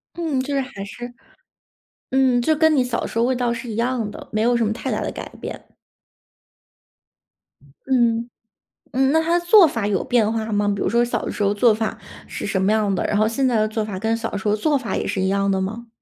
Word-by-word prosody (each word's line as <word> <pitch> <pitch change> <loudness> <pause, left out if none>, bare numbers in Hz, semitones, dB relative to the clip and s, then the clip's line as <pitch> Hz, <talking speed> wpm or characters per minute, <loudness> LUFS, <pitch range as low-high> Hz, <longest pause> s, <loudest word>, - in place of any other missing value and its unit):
嗯， 320 -6 -1
就 285 +2 -4
是 275 - +1
还 255 -7 -7
是 240 +4 -8 1.0
嗯， 260 -2 +3
就 310 +6 +2
跟 315 0 +4
你 260 - +3
小 245 -1 -2
时 - - -6
候 230 - +3
味 255 +1 +1
道 245 -1 0
是 240 +1 -6
一 220 - -4
样 235 -2 -1
的， - - -11
没 215 - 0
有 240 +2 +3
什 235 -1 +2
么 210 - 0
太 - - -4
大 - - -1
的 - - -3
改 - - -7
变。 - - -7 2.2
嗯， 235 -3 +1 0.6
嗯， 265 +2 +2
那 320 - +3
它 335 +2 +2
的 345 - -11
做 375 0 +7
法 230 -8 -2
有 195 -3 0
变 225 -3 +2
化 225 -1 -3
吗？ 205 0 +1
比 200 - -5
如 - - 0
说 235 +4 +3
小 240 - -2
的 - - -3
时 - - -6
候 200 0 +2
做 220 +2 +4
法 220 0 -3 0.3
是 - - -6
什 190 - -1
么 195 - +2
样 215 -2 +1
的， 185 - -1
然 210 - 0
后 215 +1 +3
现 260 +4 0
在 245 - +1
的 215 0 +2
做 220 0 -2
法 205 -3 -5
跟 225 +3 0
小 225 0 -4
时 200 - -4
候 210 - +3
做 290 +7 +1
法 255 -4 -4
也 - - -2
是 200 -1 -1
一 190 - +1
样 200 +1 +1
的 190 - +1
吗？ 225 +5 -5
230 Hz, 265 characters per minute, -21 LUFS, 210-260 Hz, 2.2 s, 做